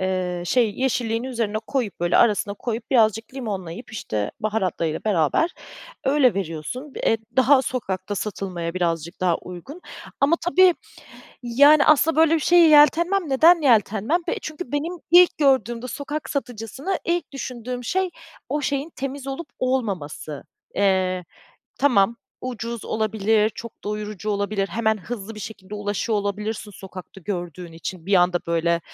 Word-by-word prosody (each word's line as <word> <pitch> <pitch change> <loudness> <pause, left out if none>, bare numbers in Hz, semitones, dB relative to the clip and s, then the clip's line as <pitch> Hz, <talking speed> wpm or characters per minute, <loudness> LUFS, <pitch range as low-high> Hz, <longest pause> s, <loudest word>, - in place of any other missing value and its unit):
Eee, 185 -2 -1
şey 235 -2 +2
yeşilliğin 235 -3 0
üzerine 230 -5 -2
koyup 240 -11 -2
böyle 175 0 +2
arasına 205 -2 +3
koyup 230 +3 -5
birazcık 225 -1 +2
limonlayıp, 205 -4 -6
işte, 105 - -3
baharatlarıyla 185 -7 -1
beraber 205 - +2 0.5
öyle 265 -6 +4
veriyorsun. 195 - -5
Eee, 225 - +3 0.2
daha 265 +1 +5
sokakta 205 -6 -3
satılmaya 185 -4 -4
birazcık 170 -1 -2
daha 175 -2 +2
uygun 180 - -10 0.4
ama 295 +5 +4
tabii, 360 0 +5 0.7
yani, 285 +5 +6
aslında 310 +1 +4
böyle 325 0 +5
bir - - +1
şeye 340 +1 +6
yeltenmem. 335 +4 +5
Neden 325 +5 +6
yeltenmem? 225 - +3
Be - - 0
çünkü 310 -3 -7
benim 305 +5 -1 0.2
ilk 355 0 +7
gördüğümde 255 -4 +2
sokak 290 +5 -5
satıcısını 265 - -3
ilk 345 -2 -1
düşündüğüm 250 -2 -5
şey 375 +7 0 0.4
o 295 +2 -1
şeyin 280 +3 -1
temiz 275 0 -5
olup 275 +5 -5
olmaması. 195 - -2 0.3
Eee, 185 -2 +1 0.5
tamam, 235 -5 +3 0.3
ucuz 235 -2 -5
olabilir, 215 0 +1
çok 230 +1 -11
doyurucu 210 0 -4
olabilir, 200 -1 -1
hemen 220 +3 +1
hızlı 225 +1 -7
bir 210 - -9
şekilde 205 -1 -8
ulaşıyor 205 +1 -1
olabilirsin 210 +1 -3
sokakta 190 0 -11
gördüğün 175 -2 -5
için, 165 +1 -7
bir 200 - +2
anda 180 -1 +3
böyle 170 0 +1
220 Hz, 135 wpm, -23 LUFS, 190-275 Hz, 0.7 s, ilk